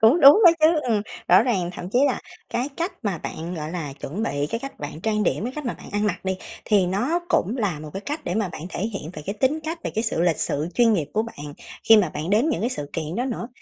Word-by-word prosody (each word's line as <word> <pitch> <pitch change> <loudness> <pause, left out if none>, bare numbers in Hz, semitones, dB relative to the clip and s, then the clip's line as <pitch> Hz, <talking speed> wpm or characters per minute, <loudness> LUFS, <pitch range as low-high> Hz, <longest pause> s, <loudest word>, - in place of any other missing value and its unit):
Cũng 235 +10 +6
đúng 285 +8 +9
đó 345 - +11
chứ, 315 0 +5
ừm, 215 -3 +2 0.3
rõ 185 +4 +7
ràng 195 -8 0
thậm 175 - -6
chí 245 - +3
là 260 - 0 0.3
cái 245 +3 -1
cách 340 +3 -1
mà 195 -5 -1
bạn, 165 +3 -5
gọi 155 -2 -5
là, 165 -5 -4
chuẩn 185 +10 -4
bị 145 -10 -1
cái 230 - -2
cách 275 +1 -8
bạn 150 +2 -6
trang 215 +2 0
điểm, 195 - 0
cái 250 - -3
cách 300 - -4
mà 240 - -1
bạn - - -12
ăn 205 +1 +1
mặc 205 - -2
đi, 190 0 -1 0.3
thì 200 -4 +3
nó 245 - 0
cũng 230 - +1
là 200 -10 -1
một 155 -1 -8
cái 195 - -4
cách 295 +2 -3
để 175 - -2
mà 210 -2 0
bạn 165 - -8
thể - - -5
hiện 200 -6 -3
về 150 - -8
cái 200 - -2
tính 290 +4 +2
cách, 325 +2 -3
về - - -1
cái 220 - 0
sự 225 - 0
lịch 170 -3 +2
sự, 150 +3 -1
chuyên 235 -2 +5
nghiệp 165 -9 +1
của 215 - +1
bạn 150 -11 -8 0.3
khi 225 - +10
mà 205 -4 +4
bạn 160 +4 -4
đến 225 +9 +3
những 315 - 0
cái 235 - 0
sự 145 - -4
kiện 160 +2 -3
đó 245 - 0
nữa. 240 -2 -4
210 Hz, 285 wpm, -24 LUFS, 170-245 Hz, 0.3 s, đó